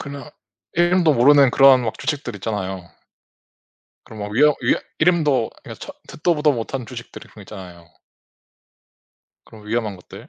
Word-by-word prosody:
그냥 140 0 -8 0.4
이름도 175 -1 +3
모르는 140 +2 +5
그러한 135 -2 +6
막 110 -2 -4
주식들 140 -7 -4
있잖아요. 95 -4 -5 1.2
그런 110 - -11
막 105 0 -5
위험 150 +5 +4
위험 120 - +1 0.2
이름도 155 -8 +2
아 - - -23
그냥 - - -10
처 - - -9
듣도 170 +2 -1
보도 150 -1 +2
못한 120 +1 -5
주식들이 120 -2 -10
분명 105 - -14
있잖아요. 90 -4 -12 1.6
그런 105 -1 -15
위험한 110 -2 -2
것들? 90 - -14
125 Hz, 325 characters per minute, -20 LUFS, 105-150 Hz, 1.6 s, 그러한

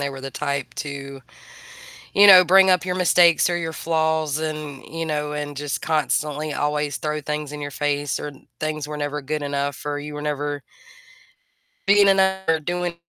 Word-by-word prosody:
they 140 - -1
were 135 -1 -8
the 135 - -5
type 140 0 -3
to, 140 -1 -6 0.9
you 205 +1 +7
know, 185 -2 +10
bring 190 +2 +6
up 180 -1 +3
your 180 0 -2
mistakes 175 -2 +4
or 175 - 0
your 165 -1 -3
flaws 160 -1 0
and, 155 -3 -5
you 165 0 -5
know, 150 -1 -2
and 145 -1 -5
just 145 0 -3
constantly 155 -1 -1
always 150 0 -1
throw 150 0 -3
things 150 0 -4
in 150 - -7
your 145 0 -5
face, 145 -1 -1
or 150 - -6 0.3
things 155 -1 -3
were 150 0 -6
never 145 0 -3
good 150 +2 -3
enough, 140 0 -3
or 145 0 -2
you 150 +1 -7
were 150 - -6
never 145 -1 -3 1.3
being 200 0 +6
enou 190 0 +3
or 160 - +3
doing 175 +2 -3
150 Hz, 185 wpm, -22 LUFS, 145-165 Hz, 1.3 s, know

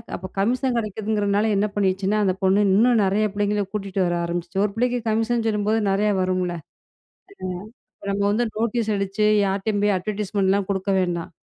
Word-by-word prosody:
அப்ப 185 - -8
கமிஷன் 250 +4 +1
கிடைக்குதுங்கிறதுனால 210 -1 0
என்ன 205 +2 +2
பண்ணிருச்சுன்னா, 195 +1 +1
அந்த 185 -2 +2
பொண்ணு 190 +2 +4
இன்னும் 230 +2 +4
நெறைய 205 +3 +1
பிள்ளைங்கள 205 0 0
கூட்டிட்டு 195 -2 -2
வர 175 0 0
ஆரம்பிச்சுச்சு. 175 +2 -3
1 205 - -2
பிள்ளைக்கு 245 +1 0
கமிஷன் 225 +1 0
சொல்லும்போது, 215 +1 +1
நெறையா 210 +2 +2
வரும்ல. 185 -1 0
அம், - - -40 1.3
இப்ப 200 - -9
நம்ப 200 0 0
வந்து 235 +4 +1
நோட்டீஸ் 230 -1 0
அடிச்சு, 200 +2 0 0.2
யார்டயும் 200 +2 -1
போய் 205 -1 +3
அட்வர்டைஸ்மென்ட்லாம் 200 -1 -1
குடுக்க 195 0 -1
வேண்டாம். 175 -1 -2
205 Hz, 155 wpm, -23 LUFS, 190-215 Hz, 1.3 s, பொண்ணு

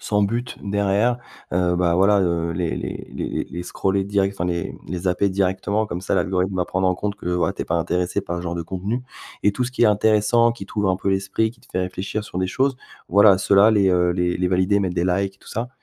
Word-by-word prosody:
sans 105 -1 +1
but 120 +4 -3
derrière, 100 +4 +2 0.4
heu, 90 0 +1
bah, 85 -1 +2
voilà, 100 +3 +4
heu, 85 -2 0
les 85 -1 -1
les - - -5
les - - -4
les - - -2
les 90 +1 -6
scroller 95 +2 -1
direct 100 0 0
enfin, 90 - -3
les, 85 -1 -2
mmh, - - -12
les 90 +2 -3
zapper 90 +2 +1
directement, 95 +3 0
comme 90 -3 -5
ça 95 - -1
l'algorithme 95 0 0
va 90 - +1
prendre 95 +1 0
en 90 - +2
compte 100 +2 -2
que, 105 - -11
voilà, 90 0 +1
tu - - -4
es - - -7
pas - - -1
intéressé 90 +2 0
par 85 - -5
ce - - -6
genre 85 -1 -3
de 85 - -3
contenu. 95 +8 -3 0.4
Et 105 - +4
tout 125 - -2
ce 125 - -4
qui 125 - -1
est - - +7
intéressant, 110 +2 +3
qui 115 -4 -7
t'ouvre 105 -1 0
un 95 - +1
peu 95 - -3
l'esprit, 95 +3 0
qui 120 - -25
te 125 - -22
fait - - -2
réfléchir 95 +3 -3
sur 90 - -6
des 95 0 0
choses, 130 +6 0 0.3
voilà, 100 0 +6
ceux-là, 100 +2 +5
les, 100 -3 +3
heu, 90 -1 +3
les 90 0 0
les 90 0 0
valider, 95 +2 +2
mettre 95 -3 -1
des 85 - +1
likes 95 +2 -1
tout - - -17
ça, 115 +3 -3
95 Hz, 260 wpm, -22 LUFS, 90-105 Hz, 0.4 s, est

